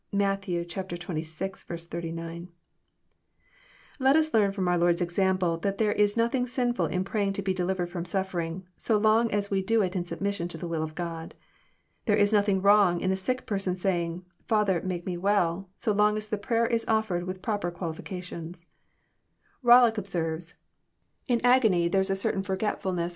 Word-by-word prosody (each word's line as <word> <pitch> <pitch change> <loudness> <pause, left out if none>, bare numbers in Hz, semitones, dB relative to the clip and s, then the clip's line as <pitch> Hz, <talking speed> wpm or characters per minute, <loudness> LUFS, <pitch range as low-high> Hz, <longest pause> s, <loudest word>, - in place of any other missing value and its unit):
(Matt. 200 0 +1
xxvi. 175 -1 -5
39.) 165 0 -6 1.5
Let 265 +2 +4
us 315 0 +3
learn 205 -3 +4
fh>m 195 -2 -2
our 175 0 +2
Lord's 175 0 +3
example 180 -1 +1
that 200 +3 -2
there 215 -2 +2
is 205 +1 +2
nothing 235 +2 +1
sinftil 245 -1 0
in 180 0 -1
praying 200 0 -1
to 200 - -3
be 190 0 0
delivered 180 -1 -2
Arom 175 -1 -4
suflierlng, 185 -2 -2
so 220 - +1
long 220 +2 +3
as 200 0 -1
we 195 -1 +2
do 225 +2 +2
it 185 0 -2
in 180 - 0
submission 195 0 -3
to 170 - -8
the 170 - -5
will 165 -2 -2
of 155 0 -5
God. 165 -2 -5 0.7
Thei 210 - +4
e - - +1
is 205 +1 +3
nothing 200 -2 +2
wrong 200 -4 +5
in 185 - 0
a - - +2
sick 255 +7 -2
person*s 195 -3 -2
saying, 175 -2 -1
<< - - -39
Father, 210 -6 +2
make 180 -2 -4
me 180 -2 -3
well,'* 190 -1 +1
so 230 - -1
long 210 +1 +3
as 215 0 -3
the 210 - -1
prayer 230 +2 +1
is 230 -1 +1
offered 220 -6 0
with 185 0 -6
proper 205 -5 -1
qualification 175 0 -6 1.1
Bollock 240 -2 +6
observes: 170 -3 -3 0.4
«* - - -43
In 240 -3 +1
as^ny 220 -9 +4
there 195 - +3
Is 190 - -2
a 195 - +1
certain 195 0 -1
fbrgetftilnesa 190 -1 -3
JOHN, 195 -3 -1
cnAP. 170 0 -1
190 Hz, 185 wpm, -27 LUFS, 175-210 Hz, 1.5 s, Bollock